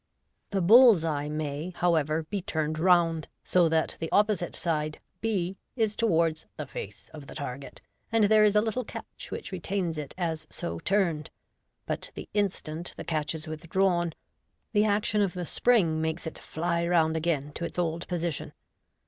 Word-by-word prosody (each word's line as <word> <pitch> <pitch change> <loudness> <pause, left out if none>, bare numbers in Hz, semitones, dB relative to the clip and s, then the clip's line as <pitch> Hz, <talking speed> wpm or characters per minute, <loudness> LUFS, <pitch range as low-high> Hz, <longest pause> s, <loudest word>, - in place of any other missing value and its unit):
The 195 -2 0
bull's 220 -2 +7
eye 150 -2 -1
may, 155 +3 -3
however, 160 -2 +2
be 200 +5 -4
turned 155 -2 -2
round, 170 -2 +3 0.2
so 175 -2 +3
that 160 0 +1
the 165 - -4
opposite 205 -4 +2
side, 155 -3 -1 0.2
b, 195 -4 -1 0.2
is 220 -3 +1
towards 165 -7 +1
the 150 - -4
face 105 -6 -8
of 150 -3 -10
the - - -10
target, 140 -2 -6 0.3
and 225 -1 +4
there 215 +1 +6
is 210 -1 +4
a 210 - +6
little 225 +3 -1
catch - - -9
which - - -6
retains 180 -3 -2
it 145 -2 -7
as 165 -3 -2
so 85 0 -4
turned 170 - +1
j - - -12 0.5
but - - -3
the - - -7
instant 175 -5 -2
the - - -5
catch 155 -1 -1
is 155 - -6
withdrawn, 175 +2 0 0.6
the 210 0 +4
action 210 0 +2
of 195 -3 +1
the 180 -1 -3
spring 170 -8 +3
makes 160 +2 -2
it 160 - -6
fly 170 +1 -1
round 160 -2 +3
again 155 -3 0
to 170 - -5
its 170 - -5
old 170 -1 -1
position. 170 -3 -3
170 Hz, 175 wpm, -28 LUFS, 155-195 Hz, 0.6 s, bull's